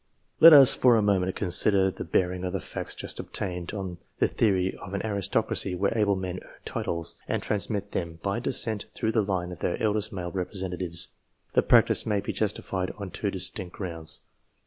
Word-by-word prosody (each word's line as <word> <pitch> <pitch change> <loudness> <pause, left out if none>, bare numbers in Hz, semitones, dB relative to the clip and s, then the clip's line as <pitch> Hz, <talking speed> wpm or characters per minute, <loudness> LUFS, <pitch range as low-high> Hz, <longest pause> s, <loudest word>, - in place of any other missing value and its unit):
Let 165 - +11
us 140 -4 +9
for 125 -2 +4
a - - +3
moment 95 -2 +1
consider 95 +2 +2
the - - -7
bearing 90 +2 0
of 90 0 -3
the 95 - -1
facts - - -6
just - - -5
obtained, 90 -3 -4
on 95 -4 -6 0.2
the - - +3
theory 95 -4 +1
of 100 0 -7
an 100 - -3
aristocracy 100 -2 0
where 100 +4 0
able 105 -3 +2
men 95 -1 -4
earn - - -16 0.2
titles, 85 -1 -1
and - - -2
transmit 105 -1 -2
them 85 -2 -4
by 100 +3 -1
descent 115 -4 0
through 110 - -1
the 110 - +2
line 95 -3 -2
of 90 - -8
their 85 - -2
eldest 110 0 0
male 90 -4 -5
representatives. 90 -2 -3 0.4
The - - +4
practice - - +4
may 105 -2 +1
be 100 - -4
justified 95 -3 -2
on 100 -3 -7
two 100 - -2
distinct 95 -1 -2
grounds. 85 -4 -2
95 Hz, 190 wpm, -27 LUFS, 90-105 Hz, 0.4 s, Let